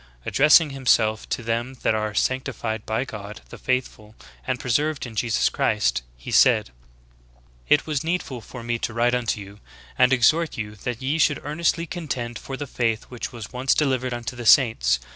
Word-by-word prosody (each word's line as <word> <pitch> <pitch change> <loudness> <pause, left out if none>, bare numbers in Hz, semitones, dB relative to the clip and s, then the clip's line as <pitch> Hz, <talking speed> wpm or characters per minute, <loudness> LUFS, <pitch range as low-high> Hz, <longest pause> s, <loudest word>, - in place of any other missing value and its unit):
Addressing 150 +1 +5
himself 110 -5 +1
"to 120 - -2
them 115 +3 -2
that - - +3
are 110 -1 -2
sanctified 120 -3 -2
by 110 +4 -1
God 105 -3 -8
the - - -11
Father 120 -4 -3 0.3
and 130 -1 -1
preserved 145 +4 0
in 120 - -8
Jesus 115 0 +1
Christ," 60 0 +1 0.2
he - - -8
said: - - +4 1.0
"It 150 - +4
was 155 -2 -2
needful 160 -7 -3
for 120 +2 -10
me 120 0 -2
to 115 - -4
write 120 +1 +2
unto 120 -3 0
you, 100 +1 -11 0.4
and 125 0 +5
exhort 155 +6 +3
you 105 -2 -4
that 120 +4 -5
ye 145 +5 0
should 150 -2 +3
earnestly 165 +3 0
contend 130 -9 -5
for 135 - -7
the 145 - -4
faith 115 -4 -1
which 125 -2 -6
was 115 0 -9
once 125 +1 +1
delivered 130 -4 0
unto 120 -1 -5
the 120 -1 -5
saints. 110 - +5
125 Hz, 180 wpm, -23 LUFS, 110-135 Hz, 1.0 s, Addressing